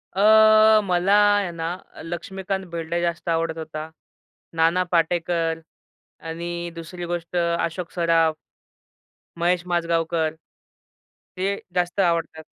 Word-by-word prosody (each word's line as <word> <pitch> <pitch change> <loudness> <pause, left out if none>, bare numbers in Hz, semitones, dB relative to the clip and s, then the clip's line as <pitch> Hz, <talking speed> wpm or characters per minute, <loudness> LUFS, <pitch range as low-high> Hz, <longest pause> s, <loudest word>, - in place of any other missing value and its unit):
अ, 215 +1 +6
मला 180 +1 +1 0.2
आहे 200 -4 0
ना, 165 0 -4 0.2
अ, - - -11
लक्ष्मीकांत 190 +3 -4
बेर्डे 170 0 -3
जास्त 170 -1 -2
आवडत 165 0 0
होता. 155 0 -6 0.7
नाना 165 +3 +3
पाटेकर 165 -1 +1 0.7
आणि 170 +1 -4
दुसरी 175 +2 -7
गोष्ट 175 0 -5
अशोक 170 0 -1
सराफ 165 -2 +2 1.0
महेश 175 +1 +1
माजगावकर 165 -2 0 1.0
ते 185 +1 0 0.3
जास्त 175 +2 -1
आवडतात. 165 -3 0
170 Hz, 105 wpm, -23 LUFS, 165-180 Hz, 1.0 s, अ